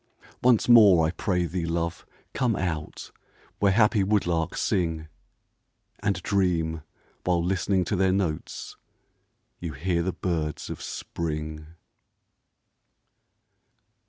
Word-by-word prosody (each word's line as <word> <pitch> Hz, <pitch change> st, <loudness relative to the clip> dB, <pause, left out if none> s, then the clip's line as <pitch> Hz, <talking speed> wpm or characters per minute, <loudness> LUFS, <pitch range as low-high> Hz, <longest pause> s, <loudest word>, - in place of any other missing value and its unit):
Once 120 Hz, -3 st, +4 dB
more, 105 Hz, -9 st, +7 dB
I 80 Hz, -, 0 dB
pray 90 Hz, 0 st, -1 dB
thee, 85 Hz, 0 st, -3 dB
love, 85 Hz, 0 st, -3 dB, 0.3 s
come 120 Hz, -5 st, +1 dB
out, 80 Hz, -4 st, -4 dB, 0.5 s
Where 100 Hz, -1 st, +4 dB
happy 105 Hz, 0 st, +4 dB
woodlarks 90 Hz, -5 st, 0 dB
sing, 80 Hz, -3 st, -1 dB, 0.9 s
And 100 Hz, -3 st, -1 dB
dream, 85 Hz, -5 st, 0 dB, 0.4 s
while 90 Hz, -2 st, +1 dB
listening 95 Hz, 0 st, +1 dB
to 105 Hz, -, -1 dB
their 95 Hz, 0 st, +2 dB
notes, 90 Hz, -5 st, -3 dB, 0.8 s
You 85 Hz, -3 st, -5 dB
hear 85 Hz, +5 st, -1 dB
the 95 Hz, +2 st, -1 dB
birds 80 Hz, -5 st, -3 dB
of -, -, -7 dB
Spring. 75 Hz, -2 st, -5 dB
90 Hz, 105 wpm, -26 LUFS, 80-95 Hz, 0.9 s, more